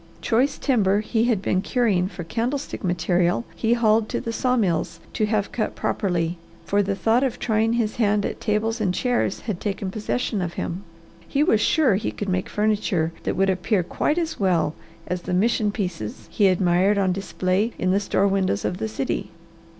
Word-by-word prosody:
Choice 260 +5 +1
timber 210 -7 +2
he 220 +1 0
had 225 -6 +1
been 185 - +1
curing 200 -7 +1
for 180 -2 -7
candlestick 240 - -3
material 175 +3 +1
he 230 0 +1
hauled 220 -2 +3
to - - -1
the 230 - -4
saw 250 +2 +1
mills 185 -9 0
to 215 - +1
have 210 -2 0
cut 220 - -2
properly, 175 -4 -1 0.3
for 205 +1 +2
the 200 0 -1
thought 225 +5 +2
of 260 -4 -1
trying 225 0 +1
his 230 -3 -1
hand 210 -3 +2
at - - -4
tables 220 +2 0
and 185 -3 +1
chairs 245 -1 0
had 205 -6 -4
taken 195 -2 -3
possession 215 0 -2
of 175 -1 -3
him. 180 +3 -4 0.4
He 280 - +1
was 220 -7 +3
sure 255 -6 +3
he 210 - -2
could 205 - -5
make 185 0 -1
furniture 205 -6 0
that - - 0
would 195 0 +3
appear 185 +1 0
quite 300 - -1
as 330 -2 -2
well 175 -6 +2 0.3
as 180 0 -3
the 180 0 -2
mission 215 +1 +2
pieces 165 - -4
he 205 - +3
admired 185 +2 +3
on 190 -2 +2
display 195 +3 -1
in 185 - +1
the 195 - +3
store 200 -1 +1
windows 190 - 0
of 180 - -2
the 110 - -1
city. 110 - -3
200 Hz, 190 wpm, -23 LUFS, 185-225 Hz, 0.4 s, hauled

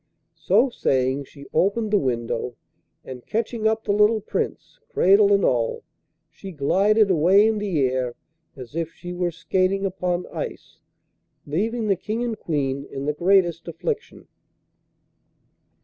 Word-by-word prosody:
So 225 +11 +3
saying, 130 - 0
she 140 +1 -14
opened 210 +3 +1
the 205 - +4
window, 120 -2 -2 0.5
and 125 -2 -9
catching 225 0 -1
up 220 0 0
the - - -1
little 210 +2 +4
Prince, 215 - -4
cradle 200 - +4
and 200 -1 +4
all, 115 -2 0 0.4
she 170 +5 -11
glided 195 +7 +3
away 185 +5 +5
in 220 -1 0
the 190 -8 -1
air 125 -1 -2 0.4
as 130 +2 -11
if 165 -1 -2
she 175 +1 -8
were 175 0 -1
skating 185 +4 0
upon 180 -2 -2
ice, - - -7 0.7
leaving 220 +10 -1
the 200 -2 +2
King 215 +6 -3
and 235 -2 -2
Queen 140 -3 -2
in 135 +1 -5
the 150 - 0
greatest 175 0 +2
affliction. 435 - -5
180 Hz, 140 wpm, -23 LUFS, 145-210 Hz, 0.7 s, away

